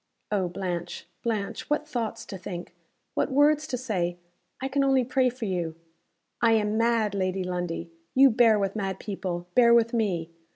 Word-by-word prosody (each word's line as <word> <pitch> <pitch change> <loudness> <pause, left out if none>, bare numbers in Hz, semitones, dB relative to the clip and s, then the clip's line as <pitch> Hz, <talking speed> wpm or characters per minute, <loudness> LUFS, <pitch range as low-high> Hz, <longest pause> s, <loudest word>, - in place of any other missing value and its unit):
"Oh, 195 -3 +1
Blanche, 175 -1 -4 0.2
Blanche, 215 -4 -3
what 300 0 0
thoughts 240 -7 -3
to - - -7
think! 175 -1 -7 0.4
what - - 0
words 295 +2 +4
to 250 - -2
say! 180 -8 -2 0.4
I 265 - -2
can 275 +1 +1
only 270 -1 +3
pray 255 +1 +2
for 245 -2 -6
you." 175 -5 -2 0.7
"I 230 -1 +5
am 210 -1 +1
mad, 230 -2 +2
Lady 185 -1 -1
Lundie. 175 -2 -3 0.2
You 270 0 +7
bear 225 -2 +5
with 195 0 -1
mad 195 -3 -2
people. 185 -4 -4
Bear 235 -1 +6
with 230 0 +3
me. 180 -8 0
215 Hz, 170 wpm, -27 LUFS, 180-245 Hz, 0.7 s, You